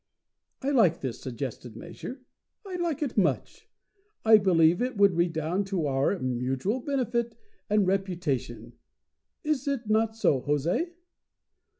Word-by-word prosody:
I 275 Hz, -, +1 dB
like 210 Hz, -, +3 dB
this 130 Hz, -4 st, -4 dB
suggested 125 Hz, -2 st, -6 dB
measure. 175 Hz, -, -8 dB, 0.4 s
I 375 Hz, -2 st, -5 dB
like 335 Hz, -3 st, -1 dB
it 250 Hz, -6 st, 0 dB
much. 180 Hz, -, -1 dB, 0.6 s
I 220 Hz, -1 st, +8 dB
believe 175 Hz, -2 st, +4 dB
it 250 Hz, -2 st, -2 dB
would 200 Hz, -3 st, +5 dB
redound 170 Hz, +3 st, 0 dB
to 185 Hz, -5 st, -1 dB
our 140 Hz, +7 st, +1 dB
mutual 130 Hz, -, -1 dB
benefit 240 Hz, -4 st, -1 dB, 0.3 s
and 210 Hz, -1 st, +3 dB
reputation. 165 Hz, -, -2 dB, 0.7 s
Is 300 Hz, -3 st, -1 dB
it 270 Hz, -5 st, -2 dB
not 220 Hz, +1 st, +2 dB
so, 150 Hz, -11 st, +2 dB
Jose?" 150 Hz, -, 0 dB
190 Hz, 125 wpm, -27 LUFS, 145-235 Hz, 0.7 s, I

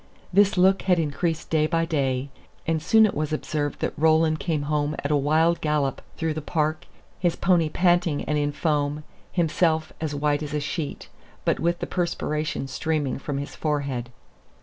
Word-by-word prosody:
This 200 Hz, 0 st, +4 dB
look 190 Hz, +2 st, +4 dB
had 180 Hz, -2 st, +3 dB
increased 160 Hz, +1 st, -1 dB
day 155 Hz, -1 st, +3 dB
by 165 Hz, 0 st, +1 dB
day: 135 Hz, -4 st, -1 dB, 0.3 s
and 160 Hz, -1 st, 0 dB
soon 220 Hz, +7 st, +5 dB
it 210 Hz, -, 0 dB
was 155 Hz, 0 st, -2 dB
observed 150 Hz, -1 st, -2 dB
that -, -, -1 dB
Roland 160 Hz, 0 st, +3 dB
came 155 Hz, -4 st, -1 dB
home 150 Hz, 0 st, 0 dB
at 145 Hz, -, -1 dB
a -, -, +4 dB
wild 160 Hz, +4 st, +2 dB
gallop 150 Hz, -3 st, 0 dB, 0.2 s
through 160 Hz, -1 st, -1 dB
the 155 Hz, -, -4 dB
park, 155 Hz, 0 st, -1 dB, 0.3 s
his 175 Hz, -2 st, +1 dB
pony 170 Hz, -3 st, +2 dB
panting 175 Hz, -3 st, +2 dB
and 150 Hz, -, -1 dB
in 145 Hz, 0 st, +1 dB
foam, 145 Hz, 0 st, -1 dB, 0.3 s
himself 160 Hz, -2 st, +1 dB
"as 155 Hz, -2 st, -2 dB
white 145 Hz, +1 st, +1 dB
as 150 Hz, 0 st, -4 dB
a -, -, +1 dB
sheet," 145 Hz, +1 st, -4 dB, 0.4 s
but -, -, +1 dB
with 170 Hz, +1 st, +1 dB
the -, -, 0 dB
perspiration 160 Hz, -3 st, -2 dB
streaming 145 Hz, 0 st, -1 dB
from 140 Hz, 0 st, -4 dB
his 140 Hz, +1 st, -5 dB
forehead. 140 Hz, -6 st, -2 dB
155 Hz, 175 wpm, -25 LUFS, 145-165 Hz, 0.4 s, soon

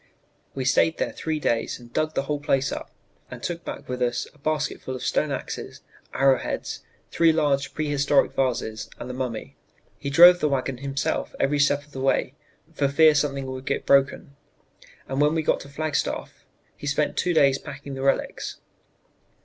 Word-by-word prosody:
We 130 Hz, -1 st, -3 dB
stayed 160 Hz, +4 st, +3 dB
there -, -, -1 dB
three 160 Hz, -1 st, -3 dB
days 115 Hz, -5 st, 0 dB
and 120 Hz, -1 st, -15 dB
dug 155 Hz, 0 st, -1 dB
the -, -, +1 dB
whole 145 Hz, +1 st, -2 dB
place 135 Hz, -1 st, +1 dB
up -, -, -5 dB, 0.4 s
and -, -, -9 dB
took 170 Hz, -1 st, -3 dB
back -, -, -7 dB
with 125 Hz, 0 st, -4 dB
us 120 Hz, -1 st, 0 dB
a 150 Hz, -, -24 dB
basket 150 Hz, +1 st, -1 dB
full 130 Hz, -, -5 dB
of 130 Hz, -, -6 dB
stone 150 Hz, -, +1 dB
axes, 135 Hz, -, -5 dB, 0.3 s
arrow 135 Hz, -1 st, +4 dB
heads, -, -, -4 dB, 0.3 s
three 165 Hz, -1 st, +4 dB
large 145 Hz, -3 st, 0 dB
prehistoric 145 Hz, -2 st, +2 dB
vases, 115 Hz, -4 st, -2 dB
and -, -, -7 dB
the 125 Hz, -, -5 dB
mummy. 125 Hz, -3 st, -5 dB, 0.4 s
He 140 Hz, -, -4 dB
drove 175 Hz, +5 st, +8 dB
the 150 Hz, -, +1 dB
wagon 135 Hz, -1 st, -1 dB
himself 140 Hz, 0 st, -2 dB
every 145 Hz, +1 st, +1 dB
step 145 Hz, 0 st, +2 dB
of 150 Hz, -, -24 dB
the 135 Hz, -, -6 dB
way, 135 Hz, -1 st, +1 dB, 0.4 s
for 145 Hz, -3 st, +1 dB
fear 155 Hz, +3 st, +6 dB
something 140 Hz, -2 st, 0 dB
would 130 Hz, +1 st, -7 dB
get -, -, -1 dB
broken, 140 Hz, 0 st, +2 dB, 0.7 s
and 135 Hz, +1 st, -1 dB
when 150 Hz, +2 st, +3 dB
we 160 Hz, -, 0 dB
got -, -, +2 dB
to 140 Hz, -, -11 dB
Flagstaff 155 Hz, +2 st, -3 dB, 0.3 s
he 145 Hz, -, -8 dB
spent 145 Hz, +1 st, 0 dB
two 175 Hz, -1 st, 0 dB
days 140 Hz, -3 st, +4 dB
packing 140 Hz, -1 st, -8 dB
the 135 Hz, -, -5 dB
relics." 135 Hz, 0 st, -1 dB
140 Hz, 185 wpm, -25 LUFS, 135-150 Hz, 0.7 s, drove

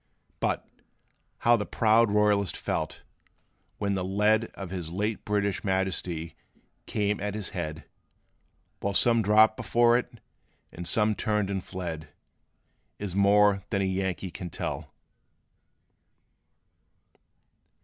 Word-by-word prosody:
But, -, -, -1 dB, 0.8 s
how 120 Hz, 0 st, +7 dB
the 105 Hz, -3 st, -2 dB
proud 115 Hz, 0 st, +3 dB
royalist 105 Hz, -3 st, +2 dB
felt, -, -, -3 dB, 0.7 s
when 100 Hz, -1 st, -1 dB
the 95 Hz, -1 st, -1 dB
lead 105 Hz, +4 st, +2 dB
Of 95 Hz, -3 st, -7 dB
his 90 Hz, -4 st, -5 dB
late 105 Hz, +4 st, -2 dB
British 100 Hz, -2 st, 0 dB
Majesty 95 Hz, -4 st, -2 dB, 0.5 s
came 105 Hz, -1 st, 0 dB
at 105 Hz, 0 st, -3 dB
his 105 Hz, -3 st, -4 dB
head, 80 Hz, -5 st, -4 dB, 1.0 s
While 100 Hz, 0 st, -2 dB
some 115 Hz, +1 st, +5 dB
dropped 110 Hz, +1 st, +5 dB
before 120 Hz, 0 st, +3 dB
it, 125 Hz, -, -8 dB, 0.6 s
and 90 Hz, 0 st, -7 dB
some 110 Hz, -1 st, +2 dB
turned 105 Hz, -2 st, 0 dB
and 95 Hz, -2 st, -2 dB
fled, 85 Hz, -5 st, -6 dB, 0.9 s
Is 100 Hz, -3 st, -5 dB
more 100 Hz, 0 st, +4 dB
than 100 Hz, -2 st, 0 dB
a -, -, +1 dB
Yankee 95 Hz, -1 st, -2 dB
can 90 Hz, +2 st, -6 dB
tell. -, -, -5 dB
100 Hz, 120 wpm, -27 LUFS, 95-105 Hz, 1.0 s, how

